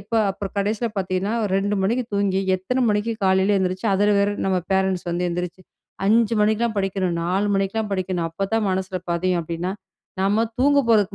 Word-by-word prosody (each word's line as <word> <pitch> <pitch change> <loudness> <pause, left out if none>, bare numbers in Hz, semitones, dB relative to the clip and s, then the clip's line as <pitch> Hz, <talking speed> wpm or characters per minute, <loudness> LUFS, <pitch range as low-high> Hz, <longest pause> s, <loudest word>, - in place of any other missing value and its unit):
எப்ப 200 +4 -19 0.2
அப்புறம் 195 0 -6
கடைசியில 210 +4 0
பார்த்தீங்கன்னா 190 +2 -1 0.2
2 200 +1 +1
மணிக்கு 235 +6 +1
தூங்கி, 195 -1 +1 0.2
எத்தனை 250 +8 -2
மணிக்கு 210 +2 0
காலையில 190 +2 +3
எந்திரிச்சு, 185 +3 -1
அதுல 205 +2 +3
வேற 200 +1 +2 0.2
நம்ம 190 -1 +2 0.2
பேரண்ட்ஸ் 190 -2 +1
வந்து 175 +1 -1
எந்திரிச்சு 180 +1 -4 0.5
5 225 +1 +3
மணிக்குல்லாம் 220 +1 +1
படிக்கணும், 190 -2 -1
4 190 +4 0
மணிக்குல்லாம் 200 +2 -1
படிக்கணும், 185 -3 -1
அப்ப 195 +4 -3
தான் 225 -2 +2
மனசுல 185 0 -2
பதியும் 180 +1 +1
அப்டின்னா, 170 +3 -3 0.5
நம்ம 205 +3 +2 0.2
தூங்க 285 +2 +4
போறதுக்கு 210 -3 +3
195 Hz, 165 wpm, -22 LUFS, 185-210 Hz, 0.5 s, தூங்க